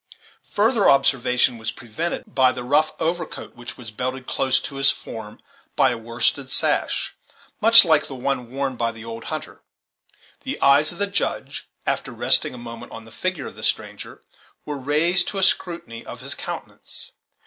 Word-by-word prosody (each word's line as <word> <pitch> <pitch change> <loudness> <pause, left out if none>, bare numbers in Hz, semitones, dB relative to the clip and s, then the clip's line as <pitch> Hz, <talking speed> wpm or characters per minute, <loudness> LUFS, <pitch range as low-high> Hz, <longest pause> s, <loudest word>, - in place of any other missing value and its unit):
Further 220 0 +4
observation 125 -3 +3
was 110 0 -3
prevented 120 +11 -4
by 130 -1 +5
the 125 - -6
rough 150 +5 +2
overcoat 170 +2 -3
which 120 0 -8
was 120 -4 -9
belted 130 +3 -4
close 130 0 +1
to 140 - -7
his 135 0 +5
form 110 -2 -5 0.4
by 130 - +4
a 120 - -3
worsted 120 +4 0
sash, - - 0 0.5
much 230 0 +9
like 155 -2 +3
the 135 - -7
one 125 -1 -2
worn 135 0 -2
by 115 -1 0
the 115 0 -11
old 115 0 -7
hunter. - - -6 0.8
The - - -4
eyes 140 +2 +5
of 175 - -11
the 200 - +1
Judge, 200 -3 -3 0.2
after - - -1
resting - - +3
a - - -9
moment 115 -1 -9
on 115 0 -9
the 115 - -14
figure 185 -3 -2
of - - -8
the - - -11
stranger, - - -3 0.4
were 150 - -4
raised 155 +6 +2
to 200 - -4
a 190 - +1
scrutiny 170 -11 0
of - - -9
his - - 0
countenance. - - -6
135 Hz, 175 wpm, -23 LUFS, 120-165 Hz, 0.8 s, much